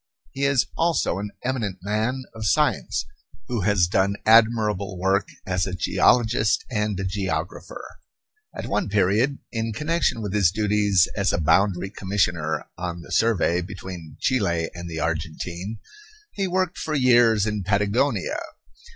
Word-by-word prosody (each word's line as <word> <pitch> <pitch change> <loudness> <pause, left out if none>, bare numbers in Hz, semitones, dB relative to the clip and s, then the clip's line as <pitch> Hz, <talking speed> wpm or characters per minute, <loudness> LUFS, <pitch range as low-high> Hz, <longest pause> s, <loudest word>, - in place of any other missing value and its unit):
He 135 +1 -1
is 140 -3 +3
also 165 - +1
an 105 +1 -4
eminent 115 -7 -2
man 110 +6 -1
of 110 -1 -3
science, 60 - +1 0.4
who 120 -4 -2
has 100 -1 +3
done 95 +3 +1
admirable 110 -4 +3
work 95 +2 +1 0.2
as 90 0 0
a 90 - -3
geologist 110 +3 +2
and 105 -4 -1
a - - -2
geographer. 95 0 -4 0.7
At - - -5
one - - -1
period, 105 +8 +2
in 115 -1 -2
connection 150 -3 0
with 100 -2 -4
his 100 -5 +4
duties 105 -3 +2
as 100 -1 +1
a - - 0
boundary 90 +4 +2
commissioner 90 -6 -1
on 85 -1 -4
the 85 - -13
survey 90 -2 +2
between 90 -4 -8
Chile 85 -10 0
and 85 0 -7
the 80 -1 -5
Argentine, 85 +5 -3 0.5
he 195 -2 -2
worked 185 -1 -1
for 155 - -2
years 120 -5 +4
in 105 -1 -2
Patagonia. 105 +4 0
100 Hz, 140 wpm, -24 LUFS, 90-115 Hz, 0.7 s, his